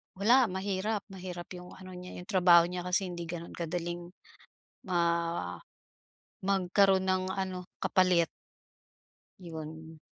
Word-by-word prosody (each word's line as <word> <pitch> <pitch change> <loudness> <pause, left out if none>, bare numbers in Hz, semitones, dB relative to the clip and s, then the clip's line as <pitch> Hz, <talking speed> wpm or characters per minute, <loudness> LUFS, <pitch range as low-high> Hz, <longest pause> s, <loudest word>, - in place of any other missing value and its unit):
wala, 235 +6 +5
mahirap 195 +2 -1
mahirap 180 -2 -7
yung 180 0 -10
ano 185 0 -11
niya, 180 0 -8
yung - - -7
trabaho 180 -4 +7
niya 180 0 -4
kasi 185 +1 +2
hindi 170 -1 -5
gano'n 170 0 -6
kadaling 175 +1 -3 0.8
ma 170 - 0 0.9
magkaroon 190 0 +3
ng 185 0 +2
ano, 185 -1 -3 0.2
kapalit. 180 -3 +4 1.1
'Yon. 160 -2 -8
180 Hz, 115 wpm, -31 LUFS, 170-190 Hz, 1.1 s, trabaho